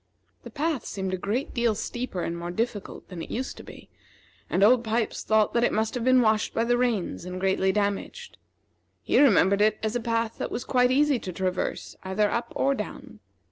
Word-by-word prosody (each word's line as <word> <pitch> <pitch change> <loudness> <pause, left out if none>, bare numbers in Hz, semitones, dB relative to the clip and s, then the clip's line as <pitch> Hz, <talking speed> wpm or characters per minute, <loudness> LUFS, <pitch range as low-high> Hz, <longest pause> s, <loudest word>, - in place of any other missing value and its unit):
The - - -10
path 300 -3 -2
seemed 190 -1 -4
a - - +2
great 210 +9 -2
deal 235 -3 +1
steeper 240 -4 -4
and 170 - -3
more 170 0 -5
difficult 220 +2 -4
than 180 -3 -7
it - - -7
used 260 +3 -4
to - - -10
be; - - -13 0.6
and 195 - +2
Old 240 +3 +5
Pipes 225 0 -1
thought 215 -1 +2
that 235 - +2
it - - +3
must 220 +1 0
have 245 - -3
been 255 0 +5
washed 215 -1 +1
by 230 - +2
the 240 +1 +2
rains 240 -9 -1
and 180 +1 -6
greatly 190 0 +2
damaged. 205 - -3 0.6
He - - +2
remembered 200 -6 +5
it 215 0 +3
as 220 +2 -1
a - - +1
path 230 -1 -2
that - - -2
was 240 - -4
quite 250 -1 +3
easy 280 0 +3
to 185 - -6
traverse 185 0 -3
either 200 +2 0
up 235 - -2
or 275 - +2
down. - - -7
220 Hz, 210 wpm, -26 LUFS, 195-245 Hz, 0.6 s, Old